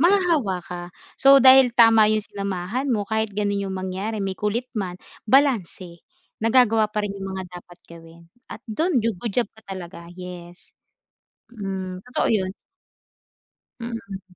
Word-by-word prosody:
mahahawa 335 - +2
ka. 180 -1 -7 0.4
So 275 0 +7
dahil 260 -1 +7
tama 225 -2 +6
'yung 215 - +1
sinamahan 200 +7 -3
mo, 205 -3 -2
kahit 220 -1 -1
gano'n 200 0 -1
'yung 195 - -4
mangyari 190 +4 -4
may 195 -1 -3
kulit 225 +4 -2
man, 185 -4 -3 0.3
balanse, 210 - +1 0.4
nagagawa 225 -1 +3
pa 210 - 0
rin 205 - -3
'yung 195 0 -6
mga 190 0 -5 0.2
dapat 175 0 -18
gawin 165 0 -14 0.3
at 225 - -9
do'n 305 - +1
ju 225 -2 -1
good 215 +3 -4
job 240 -4 +1
ka 220 - -17
talaga, 175 -2 -9
yes. 180 -1 -10 0.8
Mm, 190 -4 -5
totoo 250 - -1
'yun. 190 -3 0 1.3
Mm. 230 -5 -6
210 Hz, 145 wpm, -23 LUFS, 185-235 Hz, 1.3 s, So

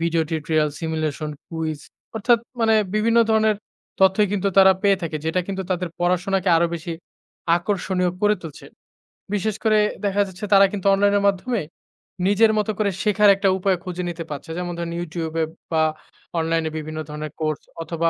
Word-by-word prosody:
Video 165 0 +1
tutorial 155 -1 0
simulation 155 -2 -3 0.2
quiz 160 -2 -3 0.4
অর্থাৎ 230 +2 +3 0.2
মানে 225 -1 +4 0.2
বিভিন্ন 230 +2 +3
ধরনের 220 -1 +3 0.4
তথ্যই 190 +1 +4
কিন্তু 200 0 0
তারা 190 0 +8
পেয়ে 200 -1 +4
থাকে, 160 -2 -3
যেটা 165 +3 +1
কিন্তু 190 -1 -3
তাদের 180 -1 -1
পড়াশোনাকে 185 +2 +1
আরো 170 +1 +3
বেশি 170 +1 -5 0.6
আকর্ষণীয় 180 -1 -1
করে 210 0 +4
তুলছে। 160 -3 -10 0.7
বিশেষ 210 +1 0
করে 215 -1 +4 0.3
দেখা 200 +1 +2
যাচ্ছে 190 +3 -7
তারা 195 0 +8
কিন্তু 200 -2 -5
অনলাইনের 200 0 +3
মাধ্যমে 205 +3 0 0.7
নিজের 220 +2 +4
মতো 210 0 +1
করে 205 -2 +2
শেখার 210 -1 +4
একটা 195 0 +1
উপায় 190 -1 +1
খুঁজে 180 -1 -4
নিতে 165 -1 -5
পারছে। 145 +2 -7
যেমন 175 -1 -3
ধরেন 170 0 -4
Youtube 165 -1 -5 0.4
বা 160 -1 +3 0.6
অনলাইনে 165 0 0
বিভিন্ন 155 0 -5
ধরনের 150 0 -6
কোর্স 155 -1 -1 0.2
অথবা 165 0 0
180 Hz, 160 wpm, -22 LUFS, 165-205 Hz, 0.7 s, তারা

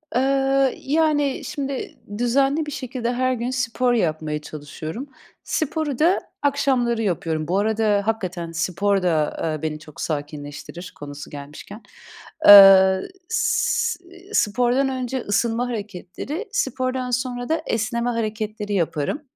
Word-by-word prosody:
Eee, 270 +1 +2
yani, 290 -2 +1
şimdi 275 -2 -4 0.2
düzenli 270 +6 +2
bir 295 - -6
şekilde 250 -2 -3
her 255 +1 +1
gün 245 0 -3
spor 250 -1 0
yapmaya 155 -7 -1
çalışıyorum. 155 - -7 0.3
Sporu 310 -3 -2
da 345 +5 +4 0.2
akşamları 260 -5 +1
yapıyorum. 165 -6 -1
Bu 180 +3 +1
arada 215 -1 +2
hakikaten 185 -6 -3
spor 190 +4 0
da, 180 - +2 0.3
aaa, 155 -2 -2
beni 155 -1 -3
çok 155 -1 -11
sakinleştirir 145 +3 -6
konusu 145 0 -8
gelmişken. 150 +9 -10 0.6
Aaa, 195 -2 +10 0.3
s 455 -2 +1
eee, 365 +2 -16
spordan 250 - +2
önce 260 0 -3
ısınma 230 +4 0
hareketleri, 220 - -5
spordan 255 - -1
sonra 245 0 -2
da 320 0 +1
esneme 235 +2 -1
hareketleri 215 -2 -3
yaparım. 170 - -1
235 Hz, 120 wpm, -22 LUFS, 185-270 Hz, 0.6 s, Aaa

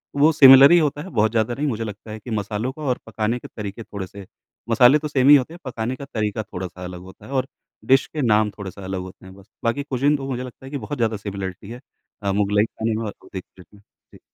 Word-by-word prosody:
वो 145 +3 +5
सिमिलर 135 -1 +9
ही 175 - +7
होता 150 -2 0
है, 190 - -9
बहुत 110 - +1
ज़्यादा 115 +1 0
नहीं 145 +5 -2
मुझे 115 -4 -2
लगता 105 0 -8
है 110 - -7
कि 120 +3 -9
मसालों 105 +3 -2
का 155 - -12
और 130 -4 0
पकाने 110 +3 -2
के - - -10
तरीके 105 +1 -7
थोड़े-से 100 -1 -8 0.4
मसाले 125 +5 +6
तो 150 - -4
सेम 140 -2 +3
ही 145 - +11
होते 140 +3 +1
हैं, 175 - -11
पकाने 120 -1 -3
का 140 - -9
तरीका 110 -3 -2
थोड़ा-सा 90 -2 -7
अलग 90 0 -7
होता 95 0 -14
है - - -11
और 130 -1 0 0.4
डिश 135 +1 +4
के 155 - -4
नाम 110 -4 +3
थोड़ा-सा 100 -1 -8
अलग 95 0 -4
होते 95 0 -11
हैं 95 - -12
बस। 100 +2 -18
बाकी 115 +5 0
कुज़ीन 140 +1 +1
तो 135 -1 -6
मुझे 125 -1 -3
लगता 130 +1 -11
है - - -8
कि 145 - -3
बहुत 135 +4 -6
ज़्यादा 115 -2 0
सिमिलरिटी 100 -1 -6
है 120 +2 -9 0.4
अ, 100 - 0
मुग़लई 105 +1 +2
खाने 110 0 -3
में 115 - -3
और 105 - -5
अवधी 95 - -7
खाने 90 +2 -19
में। - - -21 0.3
जी। - - -15
115 Hz, 255 wpm, -22 LUFS, 100-135 Hz, 0.4 s, ही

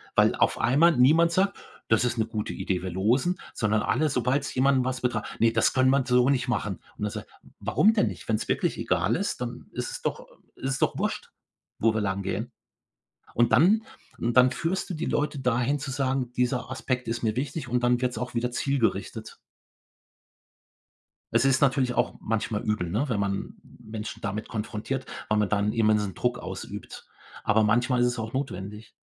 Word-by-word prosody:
Weil - - +4
auf - - +2
einmal 150 +4 +4
niemand 160 +7 +5
sagt: 195 +3 +1 0.3
„Das 110 +1 +3
ist 120 -1 -1
'ne 110 - +2
gute 105 -1 -4
Idee, 90 -2 -2
wir 95 - -3
losen“, 125 - +1
sondern 105 -1 +1
alle 155 0 +1
sobald's 130 +2 0
jemanden 130 0 +3
was 130 0 -2
betra: 115 -4 0 0.2
„Ne, 115 0 +4
das - - +3
können 130 0 +4
wir 135 -1 +3
so 125 0 +4
nicht 130 -2 +1
machen.“ 105 -5 -2 0.2
Und 105 - -2
er 105 - -2
sagt: - - -7 0.3
„Warum 215 +3 +3
denn 210 - +2
nicht? - - -7
Wenn's - - -1
wirklich - - 0
egal - - +1
ist, - - -2
dann - - -5
ist - - -4
es - - -6
doch - - -3 0.3
ist 135 0 -2
es 135 - -3
doch - - +1
Wurst, - - -3 0.5
wo 115 0 +3
wir 110 - 0
lang 100 -1 -1
gehen.“ 110 +6 -3 0.8
Und 120 0 +3
dann 210 +7 +5 0.3
und 120 +1 -1
dann 125 0 +7
führst 180 +7 -2
du - - -3
die 160 0 -3
Leute 150 -1 -1
dahin 125 +2 +1
zu 135 0 -5
sagen: 130 -2 -1
„Dieser 125 0 -1
Aspekt 130 -2 -2
ist 115 +1 -2
mir 110 -1 +1
wichtig“, 140 +2 -3
und 125 0 0
dann 120 0 +3
wird's 125 -1 -1
auch 125 0 -4
wieder 120 +1 0
zielgerichtet. 135 -1 -1 1.9
Es - - +3
ist 135 -1 +3
natürlich 130 -3 +2
auch - - +1
manchmal 110 -1 -2
übel, 105 -5 -1
ne, 120 - 0
wenn 110 -5 0
man 100 -1 -2
Menschen 110 0 -8
damit 105 0 -3
konfrontiert, 115 +4 -4 0.2
weil 110 - +2
man 105 -1 +2
dann 105 +1 +1
immensen 105 -3 +2
Druck 125 0 -1
ausübt. - - -8 0.4
Aber 110 +1 +3
manchmal 120 +3 +2
ist 125 - +4
es 120 -1 -1
auch 110 0 -4
notwendig. 105 -5 -5
125 Hz, 190 wpm, -26 LUFS, 110-135 Hz, 1.9 s, dann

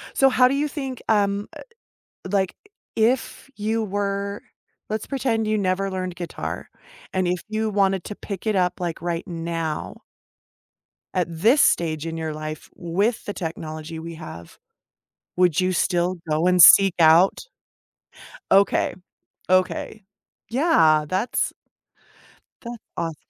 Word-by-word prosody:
So 270 - +5
how 250 -1 +5
do 265 - 0
you 295 +2 0
think, 270 -4 -5
um, 205 -1 +1
eh, - - -10 0.7
like, 190 -2 0 0.4
if 240 +4 0
you 220 +2 -1
were 200 0 -3 0.5
let's 215 0 -3
pretend 235 -5 -1
you 215 - +1
never 195 -1 0
learned 185 -1 -4
guitar, 175 -1 -6 0.5
and 185 -1 +1
if 180 0 0
you 220 0 -1
wanted 195 -3 +1
to 210 - -6
pick 200 0 -7
it 215 - +1
up, 180 -2 +1
like, 170 -2 -4
right 170 0 -3
now 165 -3 -4 1.1
at 180 -2 0
this 220 - +3
stage 160 -2 +2
in 165 0 -4
your 160 -1 -3
life, 155 0 -7
with 200 +7 -1
the 205 - -4
technology 160 -1 -6
we 165 0 -7
have, 85 - -10 0.8
would 180 -2 +3
you 185 0 +1
still 180 0 0
go 155 +3 +1
and 180 0 +5
seek 195 +2 +9
out 165 +3 +5 1.1
Okay. 195 +1 +3 0.6
Okay. 185 +3 0 0.5
Yeah, 165 - +3
that's 190 +9 -1 1.1
that 235 0 -7 0.2
awes 165 -1 -3
185 Hz, 135 wpm, -23 LUFS, 165-215 Hz, 1.1 s, seek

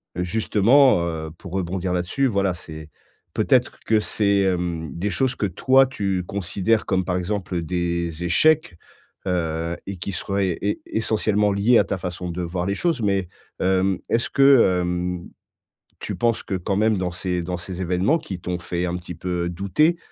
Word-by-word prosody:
justement, 110 +6 +4
heu, 80 -2 -4
pour 90 -2 -10
rebondir 95 0 -2
là-dessus, 90 +10 0
voilà, 100 -4 +1
c'est 80 -2 -10 0.4
peut-être - - +2
que 110 -1 +3
c'est, 100 -2 +1
hem, 85 -4 -1
des 95 +5 -2
choses 125 +7 0
que 105 - -1
toi 130 +8 +4
tu 95 -7 -2
considères 100 +3 0
comme, 95 -1 +1
par 90 - -1
exemple, 95 0 -3
heu, 85 - 0
des 85 -1 -2
échecs. 155 - +3 0.5
Heu 85 -1 -1
et 100 - -5
qui 90 +3 -4
serait 100 -2 -1
é 105 +1 -1
essentiellement 105 -2 +1
lié 110 +4 +4
à - - +4
ta 95 - -3
façon 90 0 -5
de 90 - -4
voir 90 +1 -3
les 100 - -1
choses, 165 -4 0
mais, 100 -3 +1 0.3
hem, 95 0 +2
est-ce 115 +1 +1
que, 135 -10 +5
hem, 90 0 -2 0.7
tu - - -4
penses 120 -1 0
que - - -5
quand 95 +2 -2
même 110 0 +3
dans 90 -1 -1
ces 90 0 -2
dans 90 0 -3
ces 90 +1 -6
événements 95 - +1
qui 95 - -7
t'ont 90 0 -3
fait 90 0 -2
un 90 0 -2
petit 90 -1 -8
peu 85 0 -2
douter, 100 - +1
95 Hz, 175 wpm, -23 LUFS, 90-105 Hz, 0.7 s, que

